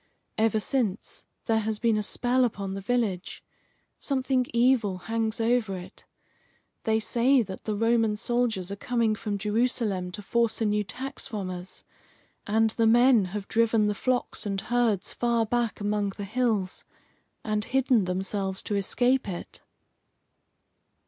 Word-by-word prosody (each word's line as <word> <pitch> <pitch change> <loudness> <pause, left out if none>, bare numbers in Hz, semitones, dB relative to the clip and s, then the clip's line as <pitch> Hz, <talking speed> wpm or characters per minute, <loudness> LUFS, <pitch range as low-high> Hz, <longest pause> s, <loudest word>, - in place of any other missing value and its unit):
Ever 220 0 +2
since, 215 -3 -2 0.2
there 225 -1 +2
has 220 0 -2
been 230 -1 +2
a 215 - +1
spell 250 +4 +2
upon 200 -5 -2
the 195 - -5
village; 200 -4 -2 0.6
something 260 -2 0
evil 235 -5 +2
hangs 225 +4 -2
over 225 -3 +1
it. 185 +2 -12 0.8
They 220 0 +2
say 245 +3 +3
that 190 -2 -9
the 215 - -1
Roman 225 -1 +2
soldiers 230 -5 -1
are - - -3
coming 230 0 0
from 210 -1 -3
Jerusalem 210 -3 0
to 205 - -7
force 235 +2 +1
a 225 - +1
new 210 0 +1
tax 265 +6 -5
from 200 -4 -4
us, 180 +1 -6 0.6
and 220 +1 +3
the 225 0 +2
men 240 -2 +5
have 200 +2 -5
driven 225 -1 +2
the 210 - +1
flocks 250 +4 -1
and 195 -2 -2
herds 235 -4 0
far 235 -1 +1
back 235 0 -1
among 205 -1 -1
the 205 - -4
hills, 215 -4 -1 0.6
and 215 0 -1
hidden 260 -5 +2
themselves 190 +1 -2
to 205 - -2
escape 245 +5 +1
it." 175 - -7
220 Hz, 150 wpm, -27 LUFS, 200-240 Hz, 0.8 s, men